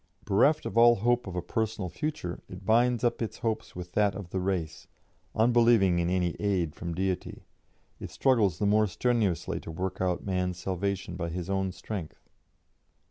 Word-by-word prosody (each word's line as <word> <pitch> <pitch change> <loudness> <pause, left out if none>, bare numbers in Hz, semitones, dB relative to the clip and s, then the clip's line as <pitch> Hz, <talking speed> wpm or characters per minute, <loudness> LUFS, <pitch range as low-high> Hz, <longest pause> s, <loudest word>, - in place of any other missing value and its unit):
Bereft 140 +10 +3
of 115 - 0
all 120 0 +7
hope 120 +2 +1
of 90 - -6
a 90 - -2
personal 110 -4 -2
future, 90 - -4
it 90 +1 -10
binds 120 +2 +3
up 120 - +1
its 115 - -3
hopes 110 -1 -3
with 90 0 -7
that 100 -1 +2
of 95 -3 -8
the 95 - -1
race; 90 -4 -3 0.5
unbelieving 115 -5 +4
in 85 0 0
any 90 -2 0
aid 95 -7 0
from 85 -1 -5
Deity, 95 0 -3 0.6
it - - -7
struggles 110 - +2
the 100 - -1
more 105 +1 +4
strenuously 105 -2 0
to - - -10
work 90 +4 -4
out 90 -1 -1
man's 90 -2 -1
salvation 95 0 -3
by 85 -1 -3
his 90 +2 -4
own 95 -1 0
strength. 90 -3 -7
95 Hz, 175 wpm, -28 LUFS, 90-110 Hz, 0.6 s, all